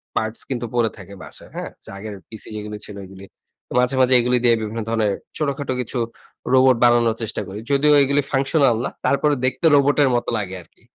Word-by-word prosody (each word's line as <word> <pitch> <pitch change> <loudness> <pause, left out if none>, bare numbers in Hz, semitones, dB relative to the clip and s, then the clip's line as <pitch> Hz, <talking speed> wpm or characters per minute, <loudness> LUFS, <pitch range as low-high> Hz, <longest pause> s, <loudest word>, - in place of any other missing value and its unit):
Parts 110 +1 -2
কিন্তু 120 -3 -3
পড়ে 115 -2 +2
থাকে 100 -1 -11
বাসায়। - - -11
হ্যাঁ? - - -5
যে - - -9
আগের 105 +1 -7 0.2
পিসি 110 -2 -7
যেগুলো 105 0 -6
ছিল 105 - -9
এগুলি। 95 +1 -12 0.5
মাঝে, 125 +2 +1
মাঝে 130 0 +4
এগুলি 125 +1 +2
দিয়ে 120 -1 +5
বিভিন্ন 110 +1 -4
ধরনের 110 -3 +1 0.2
ছোটখাটো 140 -3 -2
কিছু 125 +1 -5 0.6
রোবট 130 -1 +5
বানানোর 120 -2 +4
চেষ্টা 110 - -3
করি। 100 +2 -7
যদিও 150 +2 +4
এগুলো 140 +1 +2
ফাংশনাল 135 -2 +2
না - - -1 0.2
তারপরে 145 +1 +2
দেখতে 130 +6 -1
রোবটের 140 0 +4
মত 120 - 0
লাগে 95 -3 -4
আরকি। 85 - -24
120 Hz, 185 wpm, -21 LUFS, 110-135 Hz, 0.6 s, দিয়ে